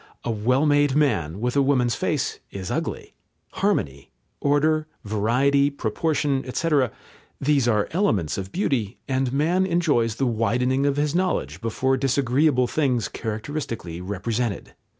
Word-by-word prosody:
A 120 - -1
well 125 +7 +1
made 145 -2 +3
man 100 - +1
with 125 +3 -1
a 140 - +4
woman's 130 -4 +2
face - - -1
is 95 -2 -6
ugly. - - -4 0.4
Harmony, 70 0 -1 0.3
order, 155 +2 +2 0.2
variety, 125 +7 +2
proportion, 140 +2 -1
etc. 140 -1 +1 0.5
these 140 -3 +2
are 105 -3 +2
elements 110 - +1
of 95 -1 -5
beauty, 125 - -1
and 130 -1 0
man 165 +7 +2
enjoys 150 - +1
the 135 - 0
widening 125 +4 +1
of 140 0 0
his 145 0 +1
knowledge 185 +1 -1
before 130 +4 0
disagreeable 135 0 +2
things 125 -3 0
characteristically 110 - -5
represented. 105 +4 -3
130 Hz, 130 wpm, -24 LUFS, 110-145 Hz, 0.5 s, a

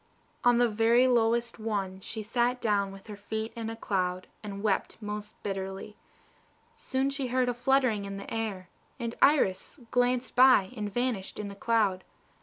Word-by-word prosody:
On 245 -1 +5
the 240 0 +4
very 230 +3 +4
lowest 235 -1 +2
one 200 -4 -2
she 215 +3 -6
sat 240 +3 0
down 205 -4 +1
with 195 0 -12
her 210 - -8
feet 220 +2 -4
in 225 -1 -4
a 225 - -5
cloud, 185 -4 -1 0.2
and 200 -1 -7
wept 205 -3 0
most 210 0 -6
bitterly. 195 +1 -5 0.8
Soon 270 - -1
she 275 -2 -2
heard 255 0 +1
a 245 - +1
fluttering 245 -4 +2
in 195 0 -5
the 200 - -7
air, 210 -5 -3 0.3
and 235 -1 -3
Iris 270 -5 +3
glanced 250 0 +1
by 250 -6 +6
and 210 -3 -4
vanished 240 -4 -2
in 210 -1 -4
the 200 - -9
cloud. 205 -4 +1
220 Hz, 170 wpm, -29 LUFS, 200-245 Hz, 0.8 s, by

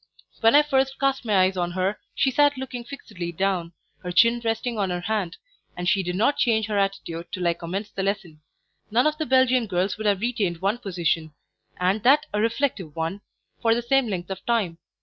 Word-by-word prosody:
When 225 +4 +5
I 295 - +7
first 270 -2 +1
cast 275 -2 0
my 205 -4 +3
eyes 190 +1 +1
on 175 -1 -2
her, 185 +3 -1 0.2
she 265 - +2
sat 290 +1 +3
looking 255 -2 -5
fixedly 210 -9 -7
down, 175 -1 -1 0.3
her 180 -1 -5
chin 230 +6 +4
resting 225 0 -1
on 195 -2 0
her 180 0 -2
hand, 200 -3 -2 0.4
and 180 0 -3
she 200 0 +3
did 180 -1 -3
not 235 +9 +2
change 220 -3 +2
her 210 -1 -1
attitude 195 -4 -3
till 180 -3 -2
I 170 - +3
commenced 190 +5 -6
the 195 - -1
lesson. 190 -6 -3 0.5
None 235 +5 +3
of 305 +1 +1
the 310 - -2
Belgian 255 -2 +3
girls 190 +2 -1
would 215 - -1
have 200 -1 +2
retained 215 -7 -1
one 200 +7 -1
position, 165 -7 -2 0.4
and 185 +4 +1
that 285 +7 +5
a 210 - +1
reflective 225 - -1
one, 165 +5 -3 0.4
for 225 0 +3
the 240 - -2
same 270 +1 +2
length 185 -3 -4
of 190 - -6
time. 205 -8 0
205 Hz, 210 wpm, -24 LUFS, 180-240 Hz, 0.5 s, I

